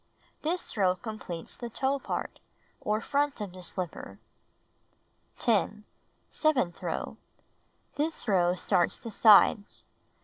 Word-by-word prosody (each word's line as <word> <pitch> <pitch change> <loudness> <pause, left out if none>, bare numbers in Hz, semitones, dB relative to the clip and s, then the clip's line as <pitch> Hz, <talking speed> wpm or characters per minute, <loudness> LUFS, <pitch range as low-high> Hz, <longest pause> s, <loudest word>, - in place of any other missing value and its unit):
This 345 0 -2
row 185 -4 +3
completes 200 -6 -7
the 240 - -6
toe 270 +4 0
part, - - -4 0.4
or 215 +1 0
front 285 +3 0
of 205 -3 -5
the 185 - -10
slipper. 180 -1 -6 1.2
10. 215 -2 +1 0.5
Seventh 255 - +1
row: - - -4 0.8
This 310 -2 -1
row 180 -3 +3
starts 180 -1 +1
the 230 - -8
sides. 210 -1 +5
215 Hz, 110 wpm, -29 LUFS, 185-265 Hz, 1.2 s, sides